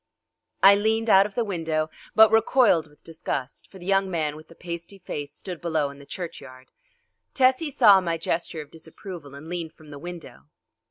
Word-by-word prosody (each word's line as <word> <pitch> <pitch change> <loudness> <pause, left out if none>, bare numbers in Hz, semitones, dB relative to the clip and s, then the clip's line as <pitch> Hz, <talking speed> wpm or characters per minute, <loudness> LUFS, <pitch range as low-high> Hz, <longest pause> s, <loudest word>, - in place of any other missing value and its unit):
I 195 +1 +10
leaned 220 +2 +1
out 195 +1 +6
of 205 - -18
the 240 - +1
window 160 -6 -2 0.2
but 220 0 +7
recoiled 225 -6 +4
with 150 - -24
disgust, 145 -5 -5
for 195 - -13
the 175 - -12
young 195 0 +2
man 155 -4 -1
with 155 +1 -13
the 165 - -16
pasty 170 +3 -7
face 145 -6 -6
stood 175 +3 -8
below 155 -4 -1
in 140 - -14
the 140 - -14
churchyard. 130 -7 -9 0.6
Tessie 260 +4 +3
saw 210 -8 +6
my 170 -2 -1
gesture 165 -2 -3
of 150 - -22
disapproval 160 -2 -10
and 145 +3 -11
leaned 170 -2 -5
from 155 -1 -16
the 145 - -9
window. 165 - -10
170 Hz, 185 wpm, -25 LUFS, 155-195 Hz, 0.6 s, I